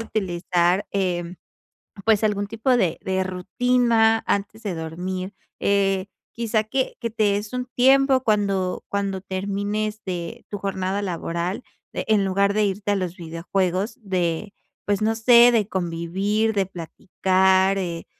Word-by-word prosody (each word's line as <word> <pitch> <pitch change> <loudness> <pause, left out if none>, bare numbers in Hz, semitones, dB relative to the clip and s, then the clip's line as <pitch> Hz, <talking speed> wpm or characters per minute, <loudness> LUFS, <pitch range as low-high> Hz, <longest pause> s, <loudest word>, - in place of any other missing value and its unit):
utilizar, 180 -3 0
em, 180 -2 -1 0.7
pues 220 -1 +4
algún 205 -1 0
tipo 225 +4 +1
de 180 -8 +1
de 190 0 0
rutina 225 +4 +2
antes 205 +3 -2
de 200 -5 -3
dormir, 180 +4 -5 0.3
eh, 195 -1 +1 0.3
quizás 225 -2 0
que 260 +1 -1
que 230 - -2
te 215 -2 +1
des 205 +1 -4
un 250 0 -3
tiempo 265 +1 +4
cuando 195 -4 0
cuando 200 -1 -2
termines 205 +3 -3
de 175 -3 -5
tu 205 - -4
jornada 195 0 -2
laboral, 175 +1 -3 0.3
de - - -3
en 210 -2 +3
lugar 200 +1 +1
de 215 0 +2
irte 205 +1 -1
a - - +1
los 180 -3 -3
videojuegos, 180 +4 -2
de 185 0 -2 0.3
pues 205 0 0
no 220 +1 +2
sé 240 +1 +7
de 215 -4 +2
convivir, 190 +5 -1
de 200 -1 +2
platicar, 190 +2 +1
eh, 170 -3 -4
195 Hz, 140 wpm, -23 LUFS, 185-215 Hz, 0.7 s, sé